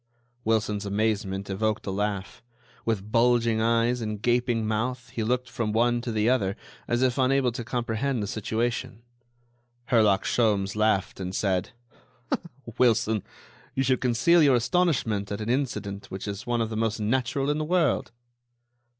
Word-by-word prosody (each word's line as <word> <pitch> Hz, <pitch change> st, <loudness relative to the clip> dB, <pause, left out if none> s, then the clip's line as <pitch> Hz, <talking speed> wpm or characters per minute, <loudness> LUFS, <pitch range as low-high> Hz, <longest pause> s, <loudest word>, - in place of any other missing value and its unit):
Wilson's 110 Hz, -2 st, 0 dB
amazement 100 Hz, -1 st, -1 dB
evoked 110 Hz, +2 st, -1 dB
a 95 Hz, -, -2 dB
laugh. 100 Hz, 0 st, -3 dB, 0.4 s
With 105 Hz, -2 st, -2 dB
bulging 115 Hz, -1 st, +3 dB
eyes 115 Hz, +2 st, +2 dB
and 110 Hz, -2 st, -3 dB
gaping 120 Hz, 0 st, +1 dB
mouth, 120 Hz, +4 st, -2 dB
he 115 Hz, -, -3 dB
looked 125 Hz, +3 st, 0 dB
from 115 Hz, -4 st, -2 dB
one 120 Hz, +1 st, +2 dB
to 120 Hz, -1 st, -4 dB
the 110 Hz, 0 st, +1 dB
other, 105 Hz, -6 st, +2 dB, 0.3 s
as 120 Hz, +2 st, +1 dB
if 130 Hz, +1 st, +1 dB
unable 130 Hz, -1 st, +3 dB
to 120 Hz, +1 st, -5 dB
comprehend 120 Hz, +1 st, -1 dB
the -, -, -1 dB
situation. 115 Hz, +2 st, -2 dB, 0.9 s
Herlock 110 Hz, -5 st, +4 dB
Sholmes 100 Hz, -4 st, +1 dB
laughed 105 Hz, -3 st, +1 dB
and 95 Hz, 0 st, -4 dB
said: 95 Hz, -2 st, 0 dB, 1.1 s
"Wilson, 115 Hz, -3 st, +3 dB, 0.5 s
you 135 Hz, -, +1 dB
should 130 Hz, -1 st, +1 dB
conceal 130 Hz, +8 st, +4 dB
your 140 Hz, -4 st, +5 dB
astonishment 120 Hz, -, +1 dB
at 100 Hz, -, -3 dB
an 110 Hz, +1 st, -4 dB
incident 120 Hz, -6 st, -2 dB
which 95 Hz, +2 st, -6 dB
is 100 Hz, +3 st, -5 dB
one 120 Hz, -1 st, +1 dB
of 115 Hz, 0 st, -2 dB
the -, -, -3 dB
most 110 Hz, 0 st, 0 dB
natural 130 Hz, +5 st, 0 dB
in 150 Hz, -, -1 dB
the -, -, -1 dB
world." 175 Hz, +2 st, +1 dB
115 Hz, 155 wpm, -26 LUFS, 105-125 Hz, 1.1 s, your